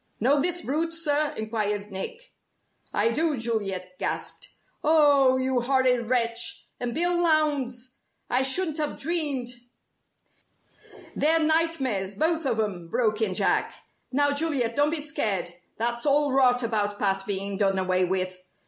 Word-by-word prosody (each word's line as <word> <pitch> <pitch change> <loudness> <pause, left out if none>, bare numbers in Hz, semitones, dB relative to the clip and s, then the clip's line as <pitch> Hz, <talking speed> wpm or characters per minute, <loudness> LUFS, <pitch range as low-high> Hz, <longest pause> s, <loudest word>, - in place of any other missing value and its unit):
"Know 275 +6 +3
this 350 +2 +2
brute, 325 +4 -1
sir?" 300 -2 +1
enquired 210 -2 -2
Nick. 480 - -6 0.6
"I 220 +3 +1
do!" 310 +3 0
Juliet 195 -6 -3
gasped. - - -3 0.3
"Oh! 285 -4 +4
you 260 -1 0
horrid 250 -2 +1
wretch! 235 -2 +1
And 240 -1 -3
Bill 350 +2 +2
Lowndes! 290 -7 0 0.3
I 250 - +1
shouldn't 310 +4 +1
have 300 -1 -2
dreamed 290 -6 +1 0.9
" - - -23
"They're 320 +2 +3
nightmares, 305 - +1
both 320 - 0
of 225 - -1
'em," 190 -6 -3
broke 215 +1 0
in 195 -4 0
Jack. - - +1 0.4
"Now, 285 +2 +3
Juliet, 285 -6 0
don't 290 +1 +3
be 315 -1 0
scared. 215 - -1 0.3
That's 235 +4 -2
all 285 -1 +2
rot 250 -2 +3
about 210 -3 -1
Pat 195 -1 0
being 200 0 -2
done 195 -1 +1
away 185 0 +1
with. 185 0 -2
255 Hz, 140 wpm, -25 LUFS, 210-300 Hz, 0.9 s, Oh